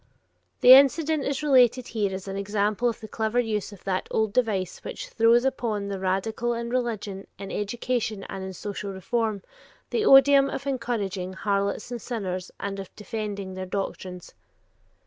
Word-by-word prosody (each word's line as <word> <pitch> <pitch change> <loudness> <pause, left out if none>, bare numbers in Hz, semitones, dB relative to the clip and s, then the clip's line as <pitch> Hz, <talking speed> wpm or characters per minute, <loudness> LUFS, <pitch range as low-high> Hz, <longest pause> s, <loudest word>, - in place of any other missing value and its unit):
The 250 - +10
incident 285 +3 +5
is 280 +2 -2
related 255 -3 +4
here 210 -4 -1
as 190 +1 -6
an 195 - -4
example 205 +3 0
of 230 - -5
the 220 - -7
clever 220 +2 -1
use 215 -4 -1
of 200 -3 -13
that 190 -1 -2
old 220 -2 0
device 205 -7 0
which - - -6
throws 230 +2 +4
upon 220 -6 -1
the 195 -1 -4
radical 215 +5 -1
in 235 0 -4
religion, 215 -6 -3
in 195 0 -7
education, 220 -1 -2
and 190 - -6
in 190 0 -6
social 200 +2 -5
reform, 210 +2 -2 0.5
the 460 - +1
oduim 275 -5 +7
of 275 - -5
encouraging 210 -8 -2
"harlots 200 +3 -1
and 240 -2 -4
sinners" 185 -6 -4
and 200 0 -4
of 195 - -7
defending 205 -2 -5
their 185 0 -5
doctrines. 185 -2 -5
215 Hz, 165 wpm, -26 LUFS, 195-240 Hz, 0.5 s, The